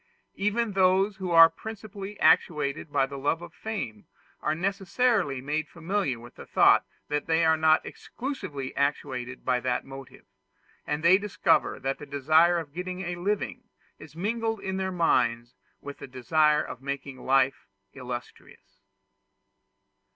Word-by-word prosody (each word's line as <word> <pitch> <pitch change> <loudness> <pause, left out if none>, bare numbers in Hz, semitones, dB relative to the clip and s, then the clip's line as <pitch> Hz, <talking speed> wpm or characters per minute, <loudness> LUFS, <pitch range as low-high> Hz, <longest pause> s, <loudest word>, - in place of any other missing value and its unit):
Even 210 +3 0
those 190 +1 +3
who 190 -2 -4
are 165 -1 +9
principally 210 0 -9
actuated 150 -2 +2
by 135 - +2
the 140 0 -8
love 155 +5 -1
of 175 - -10
fame 190 - -6 0.3
are 150 - 0
necessarily 195 - 0
made 150 +3 -2
familiar 170 - -2
with 120 +1 -13
the - - -11
thought - - +5 0.2
that 150 0 -2
they 165 0 +3
are 160 0 +5
not 160 0 +3
exclusively 190 - -6
actuated 130 -3 -2
by 125 - +2
that 125 0 -1
motive; 135 -1 -11 0.6
and 150 +1 -2
they 185 +3 +6
discover 200 -5 +1
that 135 +1 -3
the 150 - -9
desire 155 +5 +3
of 155 -4 -6
getting 180 +2 -5
a 175 -1 -3
living 205 +6 -3 0.3
is 155 0 -13
mingled 225 +4 -2
in 190 -1 -4
their 190 0 -2
minds 120 -9 +1 0.3
with 140 0 -9
the - - -8
desire 150 +4 +2
of 125 - -8
making 140 -1 -6
life 135 0 +2 0.3
illustrious. 125 -2 -9
160 Hz, 145 wpm, -27 LUFS, 135-190 Hz, 0.6 s, are